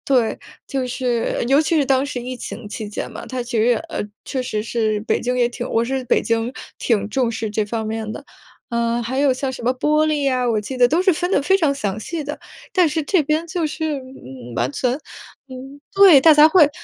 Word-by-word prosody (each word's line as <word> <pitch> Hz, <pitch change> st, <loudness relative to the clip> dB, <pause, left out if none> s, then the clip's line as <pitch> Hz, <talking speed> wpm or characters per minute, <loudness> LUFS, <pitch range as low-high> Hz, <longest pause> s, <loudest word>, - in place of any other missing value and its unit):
对， 250 Hz, -5 st, +1 dB, 0.3 s
就 265 Hz, -2 st, -2 dB
是， 245 Hz, -2 st, -1 dB
尤 275 Hz, +4 st, +4 dB
其 320 Hz, +1 st, +1 dB
是 295 Hz, -, +3 dB
当 270 Hz, 0 st, +2 dB
时 280 Hz, -3 st, -4 dB
疫 255 Hz, +1 st, -5 dB
情 235 Hz, -1 st, -7 dB
期 215 Hz, 0 st, -6 dB
间 205 Hz, -, -5 dB
嘛， -, -, -9 dB
它 255 Hz, -1 st, -4 dB
其 240 Hz, -1 st, -3 dB
实 220 Hz, -, +3 dB
也 245 Hz, -1 st, +4 dB
呃， 330 Hz, 0 st, -5 dB, 0.2 s
确 260 Hz, -2 st, -3 dB
实 215 Hz, -3 st, -3 dB
是 220 Hz, -2 st, -1 dB
北 215 Hz, -, -1 dB
京 250 Hz, +1 st, -1 dB
也 240 Hz, -, +4 dB
挺 245 Hz, 0 st, -6 dB
我 230 Hz, -, +1 dB
是 265 Hz, +2 st, -2 dB
北 -, -, +2 dB
京 230 Hz, +1 st, -1 dB, 0.3 s
挺 205 Hz, -4 st, 0 dB
重 240 Hz, +1 st, 0 dB
视 225 Hz, -1 st, -4 dB
这 215 Hz, 0 st, 0 dB
方 220 Hz, +1 st, -3 dB
面 220 Hz, -1 st, -4 dB
的。 280 Hz, -, -7 dB, 0.5 s
呃， 235 Hz, 0 st, 0 dB
还 255 Hz, +4 st, -3 dB
有 280 Hz, -2 st, +4 dB
像 260 Hz, +1 st, -3 dB
什 250 Hz, -, -8 dB
么 250 Hz, +2 st, +2 dB
玻 305 Hz, +4 st, +2 dB
璃 300 Hz, -2 st, 0 dB
呀， 255 Hz, -2 st, +1 dB
我 220 Hz, -2 st, +1 dB
记 255 Hz, +6 st, -6 dB
得 245 Hz, -1 st, +6 dB
都 325 Hz, +7 st, +2 dB
是 375 Hz, -1 st, +4 dB
分 355 Hz, +4 st, -2 dB
得 280 Hz, -, +2 dB
非 385 Hz, +6 st, +3 dB
常 300 Hz, -6 st, +2 dB
详 210 Hz, -5 st, -3 dB
细 315 Hz, +5 st, -5 dB
的。 295 Hz, -, -6 dB, 0.3 s
但 365 Hz, -4 st, +4 dB
是 310 Hz, +1 st, -1 dB
这 350 Hz, +5 st, +2 dB
边， 305 Hz, +3 st, 0 dB
就 335 Hz, 0 st, -2 dB
是， 305 Hz, -1 st, -3 dB
嗯， 130 Hz, -, -11 dB
完 120 Hz, +2 st, 0 dB
全， 250 Hz, -, 0 dB, 0.6 s
嗯 265 Hz, +2 st, -10 dB
对， 390 Hz, -8 st, +8 dB
大 320 Hz, +3 st, +7 dB
家 300 Hz, +1 st, +7 dB
会 315 Hz, -4 st, +5 dB
255 Hz, 255 characters per minute, -20 LUFS, 230-295 Hz, 0.6 s, 对